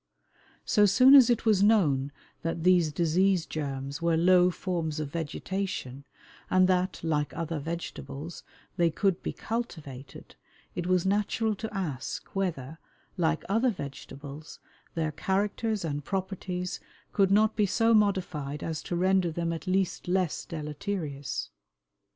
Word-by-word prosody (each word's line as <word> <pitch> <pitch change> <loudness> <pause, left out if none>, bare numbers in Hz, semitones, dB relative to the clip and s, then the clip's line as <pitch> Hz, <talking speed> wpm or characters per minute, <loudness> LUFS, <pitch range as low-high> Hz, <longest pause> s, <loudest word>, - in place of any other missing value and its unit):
So 210 -3 +4
soon 255 +7 +7
as 260 -4 +9
it 235 -1 +1
was 210 -4 +4
known 150 -11 +3 0.3
that 165 0 -3
these 175 -3 +4
disease 175 +3 +2
germs 140 -1 -4
were 170 -1 +2
low 180 +1 +5
forms 170 -4 -3
of 150 -2 -4
vegetation, 160 -4 -4 0.4
and 185 0 +5
that, 185 0 +1
like 150 -2 -1
other 165 -1 -2
vegetables, 165 0 -6 0.4
they 170 -1 +4
could 190 +2 0
be - - -3
cultivated, 150 - -6 0.4
it 175 0 -3
was 185 -1 +2
natural 210 +3 +1
to 220 +2 -6
ask 165 -11 -4
whether, 160 -6 -2 0.4
like 165 -2 0
other 225 +6 +2
vegetables, 140 - -8 0.4
their 160 -2 0
characters 205 +4 -1
and 145 -2 -3
properties 185 0 -3 0.3
could 195 -2 +3
not 215 +2 +4
be 210 -2 +2
so 225 +4 +3
modified 180 -9 +1
as 160 -2 -3
to 175 - -4
render 185 0 +2
them 170 +1 -2
at 165 +3 -7
least 185 -1 0
less 180 -2 0
deleterious. 150 -2 -4
175 Hz, 135 wpm, -28 LUFS, 155-195 Hz, 0.4 s, as